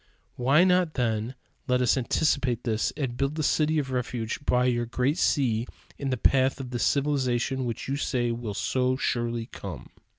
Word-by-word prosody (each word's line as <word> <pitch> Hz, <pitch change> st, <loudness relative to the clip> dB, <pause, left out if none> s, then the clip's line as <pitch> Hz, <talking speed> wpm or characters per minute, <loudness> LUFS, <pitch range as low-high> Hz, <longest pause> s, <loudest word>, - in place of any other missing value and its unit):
"Why 135 Hz, +7 st, +4 dB
not, 180 Hz, -3 st, +2 dB
then, 115 Hz, 0 st, -1 dB, 0.3 s
let 125 Hz, 0 st, +2 dB
us 125 Hz, -2 st, +3 dB
anticipate 130 Hz, -2 st, 0 dB
this 110 Hz, -2 st, 0 dB
and 130 Hz, -5 st, -2 dB
build 140 Hz, +3 st, -1 dB
the 155 Hz, -, -2 dB
city 155 Hz, +2 st, +2 dB
of 135 Hz, -3 st, -1 dB
refuge 125 Hz, -1 st, -3 dB
by 125 Hz, -2 st, +2 dB
your 120 Hz, -1 st, +1 dB
great 125 Hz, +6 st, 0 dB
sea 120 Hz, -5 st, +1 dB, 0.3 s
in 140 Hz, -, -2 dB
the 130 Hz, -, 0 dB
path 130 Hz, +3 st, +2 dB
of 130 Hz, -2 st, -6 dB
this 120 Hz, -4 st, -1 dB
civilization 135 Hz, -3 st, 0 dB
which 115 Hz, -2 st, -4 dB
you 135 Hz, -, -1 dB
say 125 Hz, -4 st, 0 dB
will 115 Hz, -3 st, -4 dB
so 130 Hz, +4 st, 0 dB
surely 120 Hz, -2 st, -1 dB
come?" -, -, -9 dB
125 Hz, 175 wpm, -27 LUFS, 120-140 Hz, 0.3 s, Why